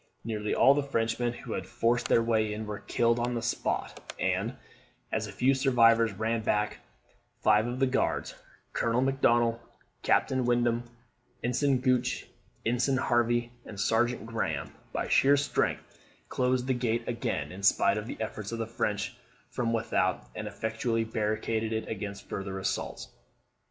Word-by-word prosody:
Nearly 105 -2 -2
all 135 - +7
the 145 - +1
Frenchmen 120 -3 0
who 120 - -7
had - - -4
forced 120 +1 +1
their 115 - +4
way 110 -2 +1
in 110 +1 -5
were 105 0 -5
killed 115 0 +1
on 120 +1 -1
the 115 - -1
spot; 120 - -3
and, 95 +6 0 0.6
as - - -1
the - - -7
few 135 +2 +3
survivors 115 -4 +4
ran 110 +3 -1
back, 105 -1 0 0.6
five 105 +2 +3
of 120 +1 -3
the 135 - +3
Guards, 130 +1 0 0.4
Colonel 115 +1 +1
Macdonnell, 120 -3 +2 0.4
Captain 130 -1 +2
Wyndham, 120 0 +1 0.5
Ensign 130 +2 +2
Gooch, 125 -1 +1 0.4
Ensign 125 +3 +2
Hervey, 120 -1 +1
and 100 - -9
Sergeant 115 +2 +1
Graham, 115 0 -3 0.2
by - - -2
sheer 140 +1 +5
strength, 145 +1 0 0.5
closed 125 0 +1
the 130 - +1
gate 120 -1 -1
again, 75 -11 -2
in 95 - -8
spite 100 +1 +4
of 105 - -7
the - - -6
efforts 110 -1 -4
of 115 - -3
the 115 - -2
French 115 +1 -2 0.4
from 120 -1 -1
without, 115 -1 0
and - - -5
effectually 115 +1 -1
barricaded 110 0 -1
it 110 0 -2
against 100 -2 -5
further 95 0 -4
assaults. 95 - -3
115 Hz, 155 wpm, -29 LUFS, 110-125 Hz, 0.6 s, all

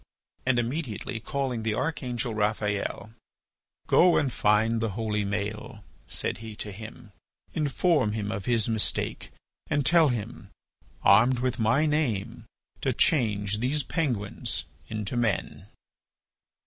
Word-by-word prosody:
And 130 -2 +3
immediately 120 -3 -2
calling 130 -1 -2
the 110 -1 -1
archangel 125 -3 -2
Raphael: 105 0 -1 0.7
"Go 180 -1 +5
and 135 -3 +1
find 110 +2 +2
the 115 - 0
holy 105 -2 0
Maël," 105 +2 -4 0.2
said - - -2
he 110 -1 -8
to 105 - -5
him; 110 +2 -10 0.4
"inform 150 - +2
him 105 -1 -2
of 100 -3 -4
his 115 -3 +2
mistake 110 -2 -1 0.4
and 145 -2 +1
tell 165 -1 +6
him, 115 -5 -4 0.5
armed 120 +6 +6
with 125 0 -1
my 120 +8 +3
Name, 120 -8 -1 0.4
to - - +1
change 105 -8 +2
these 140 +5 0
penguins 120 - -1 0.3
into 110 +1 -3
men." 115 -5 -1
115 Hz, 120 wpm, -27 LUFS, 105-130 Hz, 0.7 s, tell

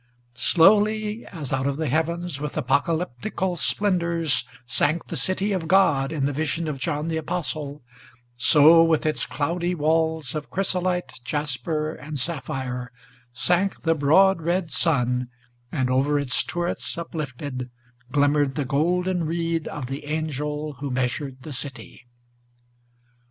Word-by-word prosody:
Slowly 210 - +3
as 150 -8 -5
out 135 +1 0
of 140 0 -1
the 160 - -1
heavens, 165 +2 -1
with 150 0 -4
apocalyptical 165 - 0
splendors, 170 - +1 0.2
Sank 145 +6 +1
the - - -3
City 185 +6 0
of 180 -5 -1
God, 160 -7 +4
in 150 -4 -1
the 145 - 0
vision 160 +3 -1
of 145 -3 -3
John 150 +1 -2
the 165 -1 -1
Apostle, 150 -4 -3 0.5
So, 155 +6 +7
with 165 -1 +2
its 155 - +1
cloudy 170 +4 -1
walls 160 -2 +1
of 150 -1 -5
chrysolite, 180 -3 -1
jasper, 150 +3 -2
and 150 -1 -7
sapphire, 130 -4 -3 0.4
Sank 175 - +1
the 165 - +2
broad 165 +5 +4
red 170 0 -1
sun, 125 -5 +1 0.4
and 130 -4 0
over 135 +3 +2
its 140 -1 +1
turrets 175 -1 -2
uplifted 145 -6 -5 0.4
Glimmered 145 -1 +2
the 145 -2 -1
golden 175 +5 +1
reed 165 0 -1
of 145 -3 -5
the 135 +4 -6
angel 150 -1 -3
who 140 -1 -3
measured 130 +1 -2
the 155 - -7
city. 130 -2 -5
155 Hz, 135 wpm, -24 LUFS, 140-170 Hz, 0.5 s, So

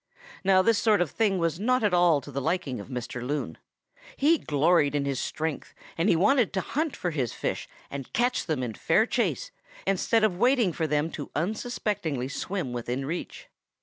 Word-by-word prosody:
"Now 190 -1 +5
this 225 +1 +3
sort 215 -2 +3
of 175 -5 0
thing 210 -4 +1
was 165 -1 0
not 255 +3 +2
at 205 -3 +2
all 175 -4 +4
to 145 - -10
the 140 0 -3
liking 135 -5 -1
of 100 - -8
Mr. 125 -1 -5
Loon. 145 +4 -3 0.6
He 310 +3 +4
gloried 150 0 +2
in 140 -1 0
his 140 -2 -1
strength 160 -2 -4 0.2
and 170 +5 +1
he - - +5
wanted 215 +6 +3
to 190 - 0
hunt 310 - -2
for 175 - -2
his 130 -7 -2
fish - - -3 0.2
and 135 -2 -6
catch 245 -1 0
them 150 -6 -1
in 120 -3 -3
fair - - +2
chase - - -1 0.3
instead 195 +4 +2
of 185 -5 +1
waiting 245 -7 +3
for 160 0 -1
them 150 +2 0
to 145 - -6
unsuspectingly 175 - -2
swim 170 -2 -3
within 125 +2 -3
reach. 170 +5 -5
170 Hz, 190 wpm, -27 LUFS, 140-210 Hz, 0.6 s, Now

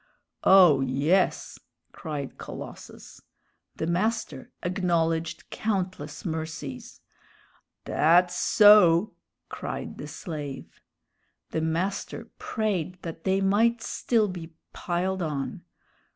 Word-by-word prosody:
"Oh, 180 -8 +7
yes!" 140 +8 +1 0.3
cried 150 -5 -6
Colossus. - - -10 0.5
The - - -3
master 175 - -2
acknowledged 165 -3 -1
countless 185 -8 -3
mercies. 160 -5 -6 0.8
"Dat's 175 +3 +3
so!" 205 -2 +6 0.3
cried - - -6
the - - -6
slave. 145 -6 -7 0.7
The 160 - -1
master 170 +5 -3
prayed 190 -6 -2
that 165 -1 -7
they 190 0 +2
might 225 +4 +2
still 225 -3 +1
be 170 -3 -8 0.2
"piled 185 +2 -2
on." 150 -5 -3
175 Hz, 90 wpm, -26 LUFS, 160-195 Hz, 0.8 s, Oh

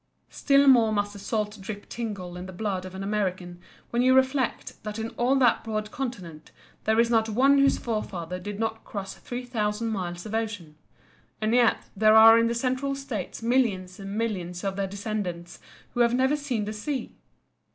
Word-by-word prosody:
Still 280 0 +3
more 240 -5 +6
must 205 -1 -1
the 200 - -10
salt 210 0 -3
drop 205 +1 -7
tingle 200 -7 -5
in 180 +1 -7
the - - -8
blood 190 -1 -3
of 185 0 -9
an 190 - -5
American 185 -4 -2 0.3
when 240 - +1
you 255 +1 +5
reflect 260 -1 0
that 210 0 -6
in 225 0 -3
all 250 +3 +1
that 250 -3 +3
broad 215 -1 -3
continent 195 - -6 0.4
there 220 +1 +3
is 235 0 +3
not 225 -1 +3
one 270 +6 +4
whose 275 0 +4
forefather 180 -6 -4
did 205 +2 -6
not 225 0 -2
cross 195 -2 -6
3000 230 -3 -3
miles 175 -4 -4
of 215 - -7
ocean. 205 -9 -3 0.6
And 215 +1 0
yet 240 -2 +3
there 215 +2 +5
are 225 +1 +9
in 230 - +3
the 235 - -1
Central 260 +3 -1
States 250 -7 -5
millions 210 -7 0
and 195 +1 -6
millions 180 -6 -3
of 195 -1 -2
their 195 -1 -1
descendants 190 -4 -5 0.3
who - - -4
have 240 0 +4
never 265 +3 +2
seen 260 -8 -2
the 215 - -4
sea. 250 +4 -4
215 Hz, 185 wpm, -26 LUFS, 195-240 Hz, 0.6 s, are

